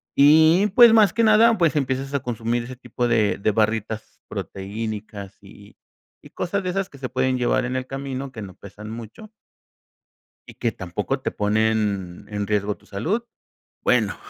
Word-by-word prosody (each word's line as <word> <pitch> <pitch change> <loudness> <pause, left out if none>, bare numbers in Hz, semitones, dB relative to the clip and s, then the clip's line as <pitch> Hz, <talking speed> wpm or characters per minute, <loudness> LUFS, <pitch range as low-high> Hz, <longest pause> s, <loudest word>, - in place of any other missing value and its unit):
Y, 160 +7 +6
pues, 240 -2 +9
más 215 -3 +5
que 230 - +1
nada, 225 +1 +5
pues, 165 -5 +2
empiezas 135 0 -2
a 140 - +1
consumir 120 0 -2
ese 125 +2 -8
tipo 125 0 -3
de 110 -3 +2
de 110 - +1
barritas 110 0 -2
proteínicas, 105 0 -6
y 100 +1 -16 0.5
y - - -13
cosas 200 +3 -2
de 185 - -2
esas 195 +1 -1
que 140 - -15
se 130 -1 -4
pueden 130 0 0
llevar 125 +1 +1
en 125 +1 -3
el 130 0 -3
camino, 135 0 -5
que 115 -5 -8
no 95 -2 -9
pesan 105 +3 -11
mucho. 115 - -10 1.2
y - - -12
que 115 -2 -2
tampoco 105 +9 -4
te - - -2
ponen 105 -3 -1
en 105 -1 -3
riesgo 105 -1 -1
tu - - -26
salud, 180 - -2 0.6
bueno, - - +1
120 Hz, 170 wpm, -23 LUFS, 105-140 Hz, 1.2 s, pues